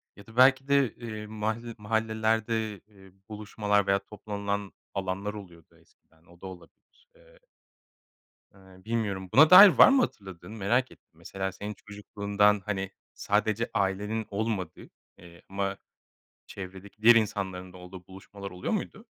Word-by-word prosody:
ya 100 - -15
da 110 +2 -16
belki 130 +1 +5
de, 140 -3 +2
eee, 110 -3 -8
mahal 110 +2 -4
mahallelerde, 110 -1 -1
ııı, 95 -2 -19 0.2
buluşmalar 105 -1 -1
veya 100 0 +2
toplanılan 100 0 -5 0.2
alanlar 95 +2 -3
oluyordu 85 -6 -13
eskiden. 80 +1 -30
O 85 +1 -21
da - - -10
olabilir. 95 - -16
Eee - - -22 1.2
Eee, 95 -1 -19
bilmiyorum, 105 -5 -3
buna 155 +7 +7
dair 200 +3 +11
var 185 - +7
mı 270 0 +4
hatırladığın? 95 - -6
Merak 120 +6 +1
ettim. - - -22
Mesela 95 -1 -5
senin 105 +2 -7
çocukluğundan, 105 0 0
hani, 95 -2 -3 0.2
sadece 110 +2 -1
ailenin 105 +3 -1
olmadığı, 100 -5 -4 0.3
eee, 85 -1 -16
ama 100 0 -3 0.7
çevredeki 95 +2 -10
diğer 120 +1 +7
insanların 95 -4 -2
da - - -12
olduğu 90 0 -12
buluşmalar 100 +1 -10
oluyor 90 0 -4
muydu? - - -5
105 Hz, 140 wpm, -27 LUFS, 95-110 Hz, 1.2 s, dair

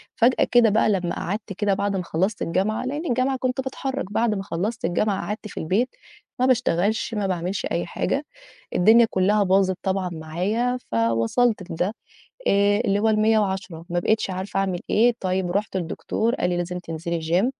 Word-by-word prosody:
فجأة 240 +2 +4
كده 240 -2 +6
بقى 215 +1 +3
لمّا 180 -3 0
قعدت 205 +2 -4
كده 200 +1 +1
بعد 200 0 -1
ما 180 - -1
خلّصت 190 +6 -1
الجامعة 195 +7 0
-لإن 295 +5 -3
الجامعة 255 +2 +1
كنت 255 +1 -1
باتحرّك 265 -4 -4
بعد 225 -1 +2
ما 195 - -3
خلّصت 215 +8 -3
الجامعة، 195 +3 0
قعدت 215 +1 -4
في - - -7
البيت، 200 +10 +1 0.5
ما 255 - +3
باشتغلش، 220 -4 +1
ما 205 -3 -1
باعملش 180 0 -2
أي 170 - 0
حاجة. 275 - -2 0.5
الدنيا 225 +5 +6
كلّها 205 +3 +2
باظت 190 -1 +2
طبعًا 190 -2 0
معايا، 185 +10 -1
فوصلت 115 - +1
لده، 180 +6 -1 0.5
آآ 200 +1 +4
اللي 200 -1 +2
هو 220 +1 +2
ال110 200 -6 +1
ما 175 0 0
بقيتش 215 +3 +1
عارفة 190 +1 -3
أعمل 190 -2 -1
إيه، 240 +3 +4
طيّب 185 -1 -1
رُحت 200 +1 -1
لدكتور، 215 +7 -1
قال 180 - 0
لي 175 - 0
لازم 175 +1 -3
تنزلي 165 0 -4
gym 175 +7 +2
195 Hz, 175 wpm, -23 LUFS, 180-225 Hz, 0.5 s, كده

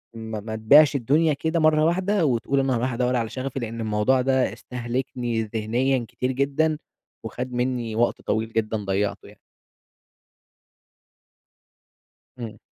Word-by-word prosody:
ما 110 -1 -5
ما 110 +1 -6
تبيعش 140 +6 +6
الدنيا 150 +5 +2
كده 160 +4 -1
مرَّة 155 0 +4
واحدة 185 +2 +1
وتقول 135 +1 +1
أنا 135 -1 +1
هارُوح 125 +2 -1
أدوَّر 125 +1 0
على 115 -2 -1
شغفي. 135 +1 -4
لأن 115 -1 -5
الموضوع 110 +4 +2
ده 130 0 +1
استهلكني 120 -1 -3
ذهنيًا 115 +4 0
كتير 125 +1 -2
جدًا 145 +4 +1 0.5
وخد 125 0 -5
مني 120 -3 -1
وقت 120 +1 +1
طويل 110 +1 -2
جدًا 110 0 0
ضيَّعته 100 +1 -1
يعني. - - -17 3.0
إمم. 115 -2 -7
125 Hz, 130 wpm, -24 LUFS, 115-135 Hz, 3.0 s, تبيعش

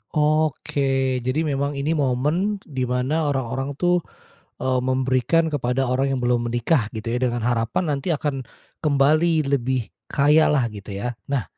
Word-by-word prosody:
Oke. 155 -1 +1 0.5
Jadi 130 +4 0
memang 140 +1 0
ini 155 +4 0
momen 150 +9 0
di 130 -4 -3
mana 125 +3 0 0.2
orang-orang 135 +1 -2
tuh, 175 -1 +2 0.5
eee, 130 -1 0
memberikan 130 +5 +1
kepada 130 -2 0
orang 130 +2 +1
yang - - -3
belum 120 -1 +1
menikah 120 0 +1
gitu 115 +1 -4
ya, 125 - 0
dengan 120 -2 -1
harapan 115 +7 0
nanti 140 +4 -3
akan 150 -4 -1 0.4
kembali 155 +3 +3
lebih 130 -3 0 0.2
kaya 150 +3 +4
lah, 145 -4 +2
gitu 100 -1 -8
ya? 120 +5 -3 0.2
Nah, 140 -6 0
135 Hz, 150 wpm, -23 LUFS, 125-150 Hz, 0.5 s, kaya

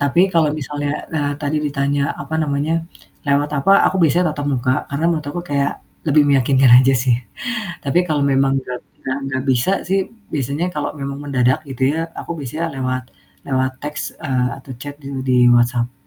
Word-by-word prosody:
Tapi 140 +4 +3
kalau 160 -3 +4
misalnya, 145 0 -3
eee, 145 -1 0
tadi 145 +1 -1
ditanya, 140 0 0 0.2
apa 140 +3 -6
namanya, 145 +2 0 0.5
lewat 145 +1 +2
apa, 195 +8 +4
aku 190 - +1
biasanya 165 +2 +3
tatap 145 -1 -4
muka 130 0 +1 0.2
karena 140 +4 -2
menurut 155 -3 -2
aku 175 +3 -4
kayak 140 -2 0 0.4
lebih 150 0 +5
meyakinkan 135 -2 +4
aja 135 +1 +4
sih. 125 0 +2 0.7
Tapi 145 +5 +2
kalau 150 -3 +1
memang 135 -1 +3
nggak 125 -1 -6 0.2
nggak 130 +1 -2
nggak 130 -1 -2
bisa 130 +8 +2 0.2
sih 195 +1 +2 0.3
biasanya 140 +4 -1
kalau 150 - -2
memang 140 0 -4
mendadak 130 0 +2
gitu 130 -1 -8
ya, - - -2 0.2
aku - - -6
biasanya 155 +5 -3
lewat 130 0 -1 0.4
lewat 130 -1 +1
teks, 150 +1 -4 0.2
eee, 125 -3 +1
atau 135 - -11
chat 145 0 -6
di 135 - -9 0.2
di 130 -1 +2 0.2
WhatsApp. 120 +1 +2
140 Hz, 175 wpm, -19 LUFS, 130-150 Hz, 0.7 s, lebih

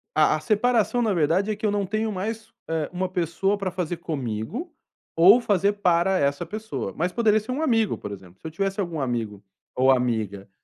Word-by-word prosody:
A 155 0 +4
a - - -6
separação 230 +6 +1
na 215 -4 +1
verdade 180 +6 +1
é - - -1
que 215 - -5
eu 205 - +2
não 205 -1 0
tenho 215 +3 -1
mais, 220 +3 -5 0.2
eh, 160 -2 -1
uma 185 +1 -2
pessoa 180 +4 0
para 195 -2 -2
fazer 175 -2 -3
comigo, 155 - -4 0.4
ou 190 +9 +7
fazer 200 -1 +2
para 185 -1 +2
essa 140 0 0
pessoa. 175 - -5
Mas 175 +2 -1
poderia 220 0 +3
ser 215 +4 -7
um 275 - -2
amigo, 225 -8 +2
por 105 - -7
exemplo. 95 -2 -11
Se - - -8
eu 160 - -7
tivesse 195 +3 -2
algum 170 -5 -2
amigo 115 -6 -3 0.3
ou 130 +1 +4
amiga 110 -6 -1
185 Hz, 205 wpm, -24 LUFS, 140-215 Hz, 0.4 s, ou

